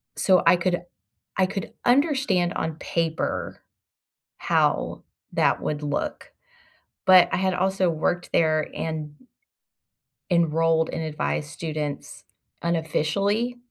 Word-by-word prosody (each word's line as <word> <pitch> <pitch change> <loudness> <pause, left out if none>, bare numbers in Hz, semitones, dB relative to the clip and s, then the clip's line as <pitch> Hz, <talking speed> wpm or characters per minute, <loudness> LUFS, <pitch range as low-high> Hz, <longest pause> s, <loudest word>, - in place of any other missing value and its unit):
So 185 -2 +3
I - - +7
could 175 0 -1 0.5
I 190 - +4
could 195 +1 -5
understand 250 - +2
on 160 -1 -3
paper 165 0 -2 0.8
how - - 0 0.3
that - - +2
would 150 -1 -2
look. 145 -1 -3 0.7
But 185 -1 +7
I - - +1
had 190 0 +1
also 190 0 +1
worked 170 +2 -1
there 155 -1 +2
and 155 -2 -4 1.2
enrolled 165 -1 +2
and 160 - -3
advised 150 -1 -2
students 155 -2 -5 0.4
unofficially 195 +8 0
170 Hz, 105 wpm, -24 LUFS, 155-190 Hz, 1.2 s, I